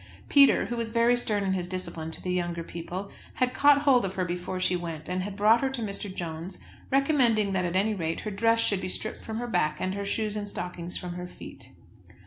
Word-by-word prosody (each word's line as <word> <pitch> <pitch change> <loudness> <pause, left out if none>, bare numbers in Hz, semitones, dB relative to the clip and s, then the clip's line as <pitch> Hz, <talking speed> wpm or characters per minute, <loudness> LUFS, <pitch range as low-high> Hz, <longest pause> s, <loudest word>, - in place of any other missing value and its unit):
Peter, 280 -1 +6
who 240 - -3
was 230 -1 -2
very 235 +1 +4
stern 210 -4 -1
in 190 -1 +1
his 180 -2 -2
discipline 180 -3 -4
to 160 - -7
the 180 - -1
younger 175 -1 -2
people, 175 +4 -6 0.2
had 255 -1 +1
caught 285 +1 +5
hold 265 -5 +5
of 190 0 -3
her 185 - 0
before 180 +1 -3
she 185 0 +2
went, 165 -3 -5
and 185 +1 -1
had 200 +1 -5
brought 220 +3 +5
her 270 - +1
to 265 -2 -5
Mr. 200 -1 -5
Jones, 170 0 -6 0.3
recommending 255 -7 +3
that 185 -1 +1
at 175 +1 -2
any 205 +3 +3
rate 165 -4 -2
her 215 - -4
dress 230 +3 +2
should 200 -4 +1
be 185 - -3
stripped 215 +3 -3
from 220 0 -5
her 240 - -3
back, 150 -9 0
and 185 - -1
her 200 0 -3
shoes 210 +1 -2
and 205 -1 -3
stockings 180 -2 -5
from 180 -1 -5
her 180 0 -6
feet. - - -12
195 Hz, 235 wpm, -27 LUFS, 180-230 Hz, 0.3 s, Peter